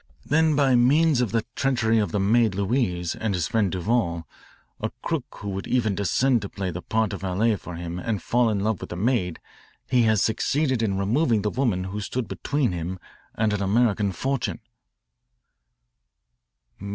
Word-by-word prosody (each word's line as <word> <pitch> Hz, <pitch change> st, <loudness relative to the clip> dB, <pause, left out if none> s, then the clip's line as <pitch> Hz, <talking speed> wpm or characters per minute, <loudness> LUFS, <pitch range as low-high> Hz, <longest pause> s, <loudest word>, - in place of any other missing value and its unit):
Then 155 Hz, 0 st, +3 dB
by 140 Hz, -2 st, +3 dB
means 140 Hz, +3 st, +4 dB
of 120 Hz, -6 st, 0 dB
the 115 Hz, 0 st, 0 dB
treachery 120 Hz, -5 st, +2 dB
of 105 Hz, -, 0 dB
the 105 Hz, -, 0 dB
maid 110 Hz, +1 st, +3 dB
Louise 95 Hz, -5 st, 0 dB
and 110 Hz, -3 st, -2 dB
his 85 Hz, -3 st, -1 dB
friend 105 Hz, -5 st, +1 dB
Duval, 90 Hz, -4 st, -1 dB, 0.5 s
a -, -, -2 dB
crook -, -, -1 dB, 0.2 s
who 100 Hz, -, -4 dB
would 95 Hz, 0 st, -4 dB
even 115 Hz, -5 st, +1 dB
descend 120 Hz, +5 st, +2 dB
to 100 Hz, -, -6 dB
play 95 Hz, -2 st, -4 dB
the 90 Hz, +2 st, -6 dB
part 110 Hz, 0 st, 0 dB
of 100 Hz, -, -6 dB
valet 100 Hz, +4 st, +1 dB
for 90 Hz, -3 st, -8 dB
him 85 Hz, +1 st, -5 dB
and 105 Hz, +2 st, -2 dB
fall 120 Hz, +6 st, +2 dB
in 100 Hz, -2 st, 0 dB
love 110 Hz, -1 st, -1 dB
with -, -, -7 dB
the -, -, -5 dB
maid, 95 Hz, -4 st, 0 dB, 0.5 s
he 125 Hz, -2 st, +3 dB
has 110 Hz, -2 st, +3 dB
succeeded 130 Hz, +2 st, +1 dB
in 100 Hz, -4 st, 0 dB
removing 110 Hz, +2 st, +1 dB
the 105 Hz, -, 0 dB
woman 115 Hz, -9 st, 0 dB
who 100 Hz, +3 st, -5 dB
stood 120 Hz, +3 st, -3 dB
between 140 Hz, -6 st, -1 dB
him 90 Hz, +2 st, -4 dB, 0.4 s
and 110 Hz, -1 st, +1 dB
an 105 Hz, -, -1 dB
American 105 Hz, 0 st, +2 dB
fortune." 135 Hz, +5 st, -2 dB
110 Hz, 175 wpm, -24 LUFS, 95-120 Hz, 0.5 s, means